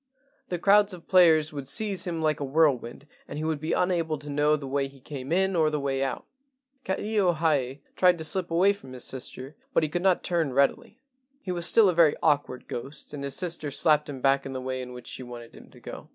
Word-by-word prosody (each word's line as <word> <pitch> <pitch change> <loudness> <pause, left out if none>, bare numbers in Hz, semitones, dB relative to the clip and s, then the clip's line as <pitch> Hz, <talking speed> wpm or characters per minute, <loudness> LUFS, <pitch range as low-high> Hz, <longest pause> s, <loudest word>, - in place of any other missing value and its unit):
The 175 - -2
crowds 200 +2 +4
of 170 - -16
players 160 -4 +5
would 140 -2 -6
seize 195 +4 0
him 165 -2 -3
like 155 -1 +1
a - - -3
whirlwind 140 -3 +1 0.2
and - - -7
he 155 - -3
would 160 -2 -1
be 155 +2 -5
un¬ 180 +1 +1
able 165 -3 -1
to 145 0 -9
know 150 +1 +2
the 145 -2 -6
way 135 0 -1
he 135 0 -17
came 135 +1 -8
in 190 +2 +2
or 160 -2 +3
the 150 -1 -2
way 135 -1 -2
out. 135 - -4 0.6
Ka 190 - -1
ilio 205 -4 +1
hae 145 -4 0
tried 180 -1 +4
to 160 - -6
slip 180 +2 0
away 180 +4 +3
from 135 -10 -13
his 125 - -5
sister, 130 +2 -5 0.2
but - - +4
he 155 - 0
could 175 +4 -2
not 185 -1 +2
turn 165 -6 -1
readily. 140 - 0 0.4
He 185 - -4
was 175 -1 0
still 225 -3 +5
a 185 - +2
very 160 -3 +4
awkward 145 -5 0
ghost, 135 +4 -7
and 140 -1 -6
his 140 -1 -3
sister 170 -5 -2
slapped 150 +1 +2
him 135 -3 -7
back 135 0 +2
in 135 - -7
the 130 - -4
way 130 0 -4
in 125 0 -8
which 125 -1 -10
she - - -7
wanted 120 -2 -10
him - - -15
to - - -17
go. - - -10
150 Hz, 245 wpm, -26 LUFS, 135-175 Hz, 0.6 s, players